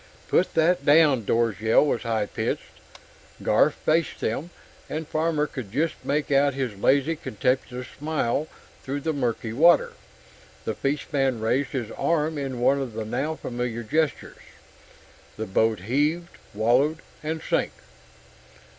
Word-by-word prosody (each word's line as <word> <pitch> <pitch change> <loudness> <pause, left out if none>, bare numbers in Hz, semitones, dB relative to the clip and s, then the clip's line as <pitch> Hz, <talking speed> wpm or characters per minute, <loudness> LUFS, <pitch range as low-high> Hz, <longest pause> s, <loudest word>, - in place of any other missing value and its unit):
"Put 185 - +2
that 165 -1 +3
down!" 145 -6 +5
Dor's 115 -2 +1
yell 110 +6 +4
was 140 - 0
high 115 -3 0
pitched. - - -4 0.6
Garf - - +4
faced 160 -1 0
them, 140 +10 -2 0.4
and 155 0 -4
Farmer 155 -1 0
could 130 -8 -7
just 155 +7 0
make 145 0 -1
out 140 0 +3
his 130 -6 -2
lazy, 140 +10 +2
contemptuous 125 0 -2
smile 150 -1 -1 0.3
through 140 +1 -4
the 160 +2 -1
murky 120 -5 -2
water. 170 +8 +5 0.7
The - - -1
fishman 135 -3 -1
raised 130 +5 0
his 120 -5 -3
arm 155 -2 0
in 135 -3 -4
one 140 +3 +3
of 125 -4 -5
the 110 0 -4
now 135 +8 -2
familiar 120 -4 -4
gestures. 155 +7 -1 1.0
The 110 - -3
boat 110 0 +1
heaved, 150 - 0 0.2
wallowed, 130 +9 +2 0.2
and 160 +1 -3
sank. - - 0
135 Hz, 135 wpm, -25 LUFS, 115-155 Hz, 1.0 s, down